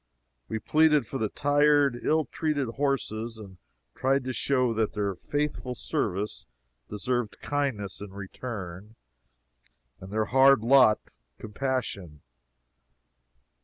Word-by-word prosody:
We -, -, -3 dB
pleaded 150 Hz, +3 st, +3 dB
for -, -, -5 dB
the 110 Hz, -1 st, 0 dB
tired, 145 Hz, -2 st, +3 dB
ill 155 Hz, 0 st, +2 dB
treated 145 Hz, -2 st, -2 dB
horses, 115 Hz, -4 st, -2 dB
and 100 Hz, -4 st, -11 dB, 0.4 s
tried 135 Hz, +1 st, +1 dB
to 130 Hz, 0 st, -3 dB
show 125 Hz, -2 st, +1 dB
that 110 Hz, -1 st, 0 dB
their 100 Hz, -2 st, -1 dB
faithful 145 Hz, +4 st, -3 dB
service 105 Hz, -2 st, -2 dB, 0.4 s
deserved 120 Hz, +2 st, -2 dB
kindness 130 Hz, -11 st, -2 dB
in 105 Hz, -, -7 dB
return, 100 Hz, 0 st, -7 dB, 1.0 s
and 95 Hz, +1 st, -10 dB
their 110 Hz, 0 st, 0 dB
hard 135 Hz, -1 st, +5 dB
lot 125 Hz, -3 st, +4 dB, 0.2 s
compassion. 105 Hz, -, -4 dB
120 Hz, 110 wpm, -27 LUFS, 105-140 Hz, 1.0 s, hard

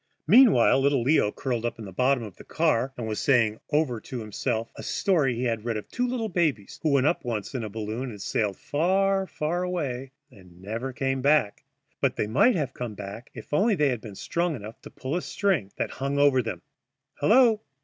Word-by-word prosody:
Meantime 195 Hz, -, +6 dB
little 140 Hz, -3 st, +2 dB
Leo, 130 Hz, -6 st, +3 dB
curled 120 Hz, -2 st, -3 dB
up 120 Hz, -, -2 dB
at 110 Hz, -, -8 dB
the 95 Hz, -, -8 dB
bottom 125 Hz, +5 st, +1 dB
of 105 Hz, -5 st, -9 dB
the -, -, -12 dB
car, 145 Hz, -6 st, +1 dB
was 110 Hz, -3 st, -3 dB
saying 115 Hz, -5 st, +2 dB
over 145 Hz, -7 st, +1 dB
to 130 Hz, -, -7 dB
himself 115 Hz, +1 st, -3 dB
a -, -, -8 dB
story 155 Hz, -, +1 dB
he 120 Hz, -, -3 dB
had 115 Hz, -3 st, -1 dB
read 115 Hz, -2 st, -2 dB
of 105 Hz, -, -7 dB
two 250 Hz, 0 st, -1 dB
little 245 Hz, -3 st, -2 dB
babies 160 Hz, -, -1 dB
who 155 Hz, -, +1 dB
went 140 Hz, -2 st, +3 dB
up 155 Hz, -, +1 dB
once 115 Hz, -3 st, -4 dB
in 125 Hz, -4 st, -3 dB
a 110 Hz, -, -4 dB
balloon 110 Hz, +4 st, -4 dB
and 105 Hz, -3 st, -9 dB
sailed 100 Hz, 0 st, -1 dB
far, 190 Hz, +5 st, +1 dB
far 165 Hz, +3 st, -2 dB
away 140 Hz, -8 st, -3 dB, 0.2 s
and 90 Hz, -6 st, -17 dB
never 115 Hz, +7 st, -4 dB
came 135 Hz, +1 st, -1 dB
back, 140 Hz, -6 st, +2 dB, 0.4 s
but -, -, +1 dB
they -, -, -1 dB
might 155 Hz, -, +3 dB
have 140 Hz, -6 st, -2 dB
come 120 Hz, -4 st, -5 dB
back 100 Hz, +4 st, -8 dB
if 115 Hz, +4 st, -10 dB
only 205 Hz, +8 st, +3 dB
they 150 Hz, -4 st, +2 dB
had 120 Hz, -4 st, -2 dB
been 105 Hz, -4 st, -9 dB
strong 170 Hz, -, -1 dB
enough 110 Hz, -1 st, -10 dB
to -, -, -11 dB
pull 135 Hz, +5 st, -5 dB
a 180 Hz, -, 0 dB
string 175 Hz, -, -1 dB
that -, -, -2 dB
hung 140 Hz, +1 st, -3 dB
over 140 Hz, -2 st, +4 dB
them. 115 Hz, -2 st, -6 dB, 0.6 s
Hello! 230 Hz, -1 st, +5 dB
130 Hz, 210 wpm, -26 LUFS, 110-160 Hz, 0.6 s, Meantime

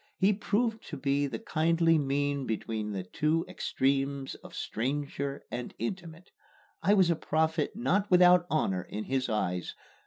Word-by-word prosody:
He 195 Hz, +2 st, +4 dB
proved 220 Hz, +2 st, -1 dB
to 150 Hz, -, -6 dB
be 140 Hz, +1 st, +1 dB
the 120 Hz, -4 st, -4 dB
kindly 165 Hz, +4 st, +2 dB
mean 140 Hz, -1 st, -1 dB
between 110 Hz, -1 st, -3 dB
the 95 Hz, -2 st, -3 dB
two 155 Hz, -, 0 dB
extremes 135 Hz, -5 st, -1 dB
of -, -, -12 dB
stranger 140 Hz, +3 st, -3 dB
and 120 Hz, 0 st, -5 dB
intimate. 170 Hz, -, -6 dB, 0.5 s
I 200 Hz, +5 st, +4 dB
was 185 Hz, -4 st, +4 dB
a -, -, +2 dB
prophet 160 Hz, 0 st, 0 dB
not 205 Hz, -3 st, +1 dB
without 180 Hz, -1 st, +6 dB
honor 95 Hz, -12 st, +1 dB
in 105 Hz, +4 st, -6 dB
his 130 Hz, 0 st, -1 dB
eyes. 90 Hz, -5 st, -2 dB
145 Hz, 150 wpm, -29 LUFS, 130-175 Hz, 0.5 s, without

